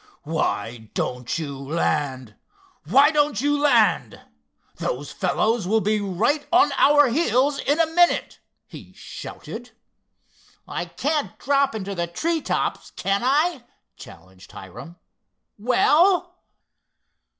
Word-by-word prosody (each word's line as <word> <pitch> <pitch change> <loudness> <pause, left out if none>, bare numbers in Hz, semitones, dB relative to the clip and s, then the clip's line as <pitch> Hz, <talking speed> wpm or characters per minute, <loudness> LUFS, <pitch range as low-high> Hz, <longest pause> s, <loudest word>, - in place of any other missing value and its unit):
"Why 120 -7 -3
don't 125 +2 -3
you 145 -4 -5
land—why 155 - -1
don't 295 -7 +1
you 290 +3 +1
land! 240 -7 +2 0.6
those 140 +3 -4
fellows 210 +2 0
will 220 +3 +2
be 210 0 0
right 210 - -1
on 350 -5 +4
our 290 0 +5
heels 275 0 +1
in 290 +3 0
a 330 - +5
minute," 345 +2 +1 0.3
he - - -13
shouted. - - -9 0.9
"I - - -4
can't 285 - -3
drop 275 -1 +1
into 200 -2 -4
the 170 -2 -2
tree 320 - -2
tops, - - -2
can 195 0 -2
I?" 290 +2 +1 0.3
challenged 95 +2 -15
Hiram—"well!" 255 - -1
235 Hz, 105 wpm, -23 LUFS, -, 0.9 s, our